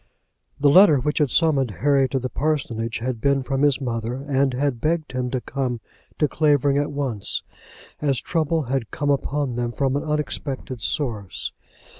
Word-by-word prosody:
The 145 Hz, 0 st, +5 dB
letter 180 Hz, -2 st, +7 dB
which 150 Hz, +5 st, -1 dB
had 150 Hz, -3 st, +3 dB
summoned 140 Hz, -4 st, +3 dB, 0.2 s
Harry 140 Hz, -2 st, +4 dB
to 135 Hz, -, -1 dB
the 130 Hz, 0 st, -2 dB
parsonage 125 Hz, -6 st, -2 dB
had 120 Hz, -1 st, -3 dB
been 140 Hz, 0 st, +2 dB
from 135 Hz, +1 st, -1 dB
his 145 Hz, -2 st, +3 dB
mother, 115 Hz, -2 st, -3 dB
and 135 Hz, -1 st, +2 dB
had 135 Hz, -3 st, -1 dB
begged 160 Hz, -2 st, 0 dB
him 125 Hz, -1 st, -2 dB
to 130 Hz, -, -1 dB
come 125 Hz, -2 st, -3 dB, 0.4 s
to 150 Hz, -, +3 dB
Clavering 145 Hz, -2 st, +2 dB
at 145 Hz, 0 st, -1 dB
once, 135 Hz, -8 st, -2 dB, 0.6 s
as 140 Hz, -4 st, +1 dB
trouble 160 Hz, -1 st, 0 dB
had 130 Hz, -3 st, -2 dB
come 145 Hz, -1 st, -1 dB
upon 140 Hz, -2 st, -1 dB
them 120 Hz, -1 st, -1 dB
from 135 Hz, +2 st, 0 dB
an 145 Hz, -, 0 dB
unexpected 145 Hz, -4 st, -3 dB
source. 110 Hz, -8 st, -2 dB
135 Hz, 170 wpm, -23 LUFS, 125-145 Hz, 0.6 s, letter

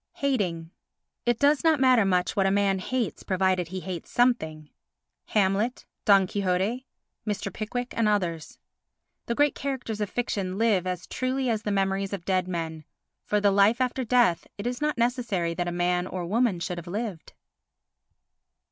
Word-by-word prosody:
Hating 180 Hz, -12 st, -1 dB, 0.6 s
It 240 Hz, -1 st, +3 dB
does 285 Hz, +2 st, +3 dB
not 320 Hz, -3 st, +4 dB
matter 255 Hz, -5 st, +5 dB
much 180 Hz, -2 st, +1 dB
what 195 Hz, -1 st, +3 dB
a -, -, +3 dB
man 195 Hz, -1 st, +2 dB
hates 245 Hz, +4 st, -2 dB
provided 185 Hz, -2 st, +1 dB
he 185 Hz, +2 st, -5 dB
hates 180 Hz, -3 st, -6 dB
something. 160 Hz, -12 st, +1 dB, 0.5 s
Hamlet, 210 Hz, +4 st, 0 dB, 0.2 s
Don 195 Hz, -3 st, +6 dB
Quixote, 200 Hz, +6 st, -1 dB, 0.4 s
Mr. 210 Hz, -1 st, -3 dB
Pickwick 245 Hz, +3 st, -4 dB
and 230 Hz, -2 st, +2 dB
others 175 Hz, -7 st, -1 dB, 0.7 s
The 235 Hz, -, -1 dB
great 290 Hz, +1 st, +3 dB
characters 255 Hz, -6 st, -4 dB
of 205 Hz, -, -1 dB
fiction 195 Hz, -6 st, -2 dB
live 205 Hz, -5 st, +2 dB
as 180 Hz, -1 st, -3 dB
truly 255 Hz, 0 st, -1 dB
as 220 Hz, -2 st, -1 dB
the 210 Hz, -, -2 dB
memories 195 Hz, 0 st, 0 dB
of 185 Hz, -3 st, -5 dB
dead 185 Hz, -1 st, +1 dB
men. 165 Hz, -3 st, -4 dB, 0.4 s
For 210 Hz, -, +1 dB
the 205 Hz, -1 st, +3 dB
life 200 Hz, +4 st, +4 dB
after 255 Hz, 0 st, 0 dB
death 240 Hz, -7 st, +2 dB
it 200 Hz, -, -6 dB
is 245 Hz, +2 st, -3 dB
not 300 Hz, -3 st, 0 dB
necessary 235 Hz, -8 st, 0 dB
that 175 Hz, +1 st, -2 dB
a -, -, -1 dB
man 180 Hz, +1 st, 0 dB
or 180 Hz, -2 st, -4 dB
woman 215 Hz, 0 st, +1 dB
should 175 Hz, 0 st, -3 dB
have 170 Hz, -, -11 dB
lived. 200 Hz, -2 st, -5 dB
200 Hz, 165 wpm, -26 LUFS, 180-240 Hz, 0.7 s, Don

